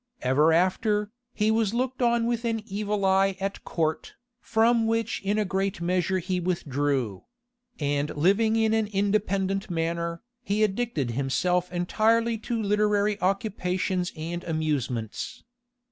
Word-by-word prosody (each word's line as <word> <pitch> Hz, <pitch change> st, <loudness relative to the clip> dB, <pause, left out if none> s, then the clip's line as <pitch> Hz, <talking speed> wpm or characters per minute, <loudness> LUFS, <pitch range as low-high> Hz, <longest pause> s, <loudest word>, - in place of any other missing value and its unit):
Ever 145 Hz, +5 st, +4 dB
after, 205 Hz, +5 st, +1 dB, 0.2 s
he 215 Hz, -1 st, +1 dB
was 220 Hz, -1 st, +1 dB
looked 255 Hz, +1 st, -1 dB
on 235 Hz, -1 st, +3 dB
with 235 Hz, 0 st, -1 dB
an 225 Hz, -2 st, -1 dB
evil 205 Hz, -1 st, -2 dB
eye 190 Hz, 0 st, +3 dB
at 195 Hz, +1 st, -4 dB
court, 160 Hz, -2 st, -2 dB, 0.2 s
from 230 Hz, 0 st, +2 dB
which 225 Hz, 0 st, -1 dB
in 200 Hz, +2 st, 0 dB
a 215 Hz, -, +1 dB
great 195 Hz, 0 st, -1 dB
measure 180 Hz, +2 st, 0 dB
he 185 Hz, 0 st, -1 dB
withdrew; 145 Hz, -, -1 dB, 0.5 s
and 145 Hz, 0 st, 0 dB
living 200 Hz, +8 st, +3 dB
in 220 Hz, -1 st, +2 dB
an 220 Hz, -1 st, +1 dB
independent 195 Hz, -1 st, 0 dB
manner, 170 Hz, +1 st, -2 dB, 0.2 s
he 215 Hz, -2 st, 0 dB
addicted 195 Hz, -, -1 dB
himself 170 Hz, +8 st, 0 dB
entirely 225 Hz, +6 st, +1 dB
to 230 Hz, +1 st, -3 dB
literary 210 Hz, 0 st, +1 dB
occupations 185 Hz, -2 st, -1 dB
and 170 Hz, +3 st, -4 dB
amusements. 145 Hz, -9 st, -2 dB
195 Hz, 130 wpm, -26 LUFS, 170-220 Hz, 0.5 s, Ever